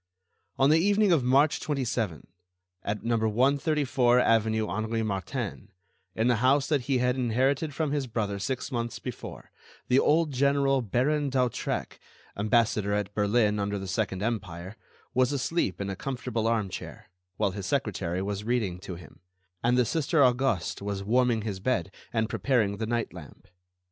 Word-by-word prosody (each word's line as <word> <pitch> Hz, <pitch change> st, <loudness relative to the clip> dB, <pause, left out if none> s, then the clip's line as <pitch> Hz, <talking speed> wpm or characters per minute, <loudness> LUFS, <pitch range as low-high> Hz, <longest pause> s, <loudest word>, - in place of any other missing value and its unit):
On 135 Hz, +2 st, +4 dB
the 160 Hz, -, +5 dB
evening 205 Hz, +2 st, +3 dB
of 160 Hz, -7 st, +3 dB
March 135 Hz, +4 st, +3 dB
27, 120 Hz, -, -2 dB, 0.6 s
at 105 Hz, +1 st, -3 dB
number 115 Hz, -1 st, +1 dB
134 135 Hz, 0 st, +2 dB
avenue 110 Hz, -2 st, +2 dB
Henri 110 Hz, +1 st, -2 dB
Martin, 100 Hz, -5 st, -4 dB, 0.5 s
in 110 Hz, -, +1 dB
the 120 Hz, -2 st, +3 dB
house 135 Hz, +4 st, +3 dB
that 140 Hz, -5 st, 0 dB
he 135 Hz, -, +3 dB
had 125 Hz, 0 st, +1 dB
inherited 130 Hz, +5 st, +1 dB
from 155 Hz, -2 st, -1 dB
his 145 Hz, -3 st, -1 dB
brother 105 Hz, -4 st, -2 dB
six 130 Hz, +7 st, -3 dB
months 120 Hz, -1 st, -3 dB
before, -, -, -8 dB, 0.4 s
the 125 Hz, -, +5 dB
old 155 Hz, +1 st, +3 dB
general 140 Hz, 0 st, +2 dB
Baron 140 Hz, +6 st, 0 dB
d'Hautrec, 125 Hz, -3 st, -1 dB, 0.4 s
ambassador 105 Hz, -1 st, +1 dB
at 105 Hz, -1 st, -2 dB
Berlin 105 Hz, 0 st, +2 dB
under 100 Hz, 0 st, -1 dB
the 95 Hz, -1 st, -6 dB
second 100 Hz, -1 st, -2 dB
Empire, 95 Hz, -4 st, -4 dB, 0.4 s
was 130 Hz, +1 st, +3 dB
asleep 140 Hz, -, -1 dB
in 100 Hz, -1 st, -3 dB
a -, -, -4 dB
comfortable 120 Hz, -1 st, -3 dB
armchair, 110 Hz, -7 st, -3 dB, 0.3 s
while 100 Hz, -, +1 dB
his 95 Hz, 0 st, -5 dB
secretary 95 Hz, -7 st, -1 dB
was 100 Hz, +1 st, -3 dB
reading 110 Hz, -6 st, -1 dB
to 95 Hz, -1 st, -7 dB
him, 85 Hz, -, -14 dB, 0.4 s
and 120 Hz, +1 st, +3 dB
the 125 Hz, -, +4 dB
Sister 160 Hz, +2 st, +2 dB
Auguste 125 Hz, -9 st, 0 dB
was 100 Hz, -1 st, -3 dB
warming 120 Hz, +1 st, +2 dB
his 100 Hz, -4 st, -4 dB
bed 100 Hz, -4 st, -1 dB, 0.2 s
and 110 Hz, -1 st, 0 dB
preparing 110 Hz, -4 st, +1 dB
the 110 Hz, +1 st, -3 dB
night 120 Hz, -5 st, -1 dB
lamp. 85 Hz, -5 st, -12 dB
115 Hz, 160 wpm, -28 LUFS, 100-135 Hz, 0.6 s, the